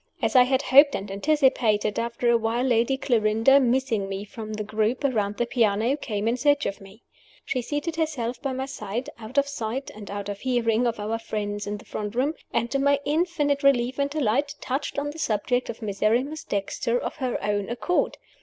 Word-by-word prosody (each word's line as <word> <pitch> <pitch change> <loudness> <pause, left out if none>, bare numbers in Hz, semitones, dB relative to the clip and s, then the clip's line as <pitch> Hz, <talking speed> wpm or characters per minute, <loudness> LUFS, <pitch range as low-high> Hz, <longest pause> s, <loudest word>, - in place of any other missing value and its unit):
As - - -1
I 250 -1 +8
had 260 +2 +1
hoped 280 +2 +6
and 195 0 -5
anticipated, 220 -4 +2
after 235 +1 -2
a - - +4
while 230 +2 0
Lady 245 +1 +2
Clarinda 230 +1 +4
(missing 240 -6 +1
me 195 +1 -4
from 215 0 -7
the 215 0 -3
group 215 +5 -1
around 210 -7 0
the 240 - +1
piano) 230 +1 +2
came 215 -7 -3
in 235 +2 +1
search 285 +2 +2
of 200 - -3
me. 195 +4 -15 0.4
She 255 - -1
seated 295 +6 -3
herself 260 -7 -2
by 275 - -2
my 260 +1 -3
side, 235 -2 -5
out 225 +5 -9
of 280 0 +4
sight 260 0 -4
and 210 -1 -10
out 200 0 -5
of 200 -1 -5
hearing 240 -2 +1
of 235 -2 -2
our 220 +2 -2
friends 205 -2 -4
in 205 0 -3
the - - -15
front 210 +1 -5
room; 275 +5 +1 0.2
and, 235 +1 -1
to 275 - +1
my 280 +1 +3
infinite 295 -2 +1
relief 260 -2 +2
and 280 0 +1
delight, 280 0 0
touched 270 +3 -3
on 290 +1 -1
the 320 - -10
subject 245 0 0
of 230 0 -6
Miserrimus 230 +9 0
Dexter 205 +4 -1
of - - -4
her 255 -4 -1
own 205 -1 -1
accord. 295 +9 0
240 Hz, 200 wpm, -25 LUFS, 215-275 Hz, 0.4 s, I